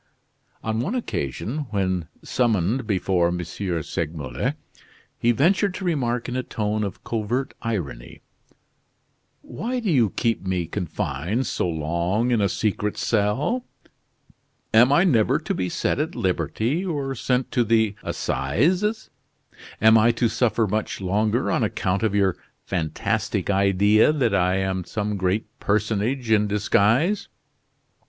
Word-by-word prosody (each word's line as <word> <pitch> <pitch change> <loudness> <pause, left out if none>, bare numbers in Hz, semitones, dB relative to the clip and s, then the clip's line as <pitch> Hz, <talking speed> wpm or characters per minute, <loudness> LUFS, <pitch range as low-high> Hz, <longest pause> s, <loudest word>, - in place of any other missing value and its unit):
On 110 0 -1
one 190 - -1
occasion, 135 - -3
when 95 -5 -1 0.2
summoned 115 0 0
before 95 -3 +1
M. 90 +1 -1
Segmuller, 80 -6 -3 0.6
he 120 - +2
ventured 190 - +2
to 190 - -5
remark 125 -8 0
in 125 - -4
a 130 - 0
tone 105 -3 -2
of 100 -3 -5
covert 120 +4 -2
irony: 80 - -5 1.2
"Why 250 +3 -4
do 220 -6 -1
you 120 -8 +4
keep 115 +2 -1
me 95 -2 -1
confined 90 - -2
so 90 - -1
long 85 +9 0
in 115 -3 +2
a 100 - +2
secret 105 +1 -1
cell? 120 - 0 1.1
Am 120 +4 +6
I 145 +5 +5
never 120 - +3
to - - -3
be 90 -1 -2
set - - -1
at 155 +3 -2
liberty 115 - -1
or 145 -7 -2
sent 125 0 -1
to 120 - +2
the 110 -2 +2
assizes. 180 - 0 0.7
Am 110 +1 +6
I 115 +2 +5
to 115 +1 +1
suffer 115 -1 +1
much 105 +2 -2
longer 105 +5 0
on - - +1
account 100 -3 0
of 110 -2 0
your 95 -3 +2 0.3
fantastic 85 +2 -1
idea 100 +5 +4
that 130 -8 +1
I 90 -1 +2
am 95 -1 -1
some 105 +2 -3
great 95 +2 0
personage 110 +4 0
in 105 -1 +4
disguise?" 105 - +2
110 Hz, 135 wpm, -23 LUFS, 95-125 Hz, 1.2 s, Am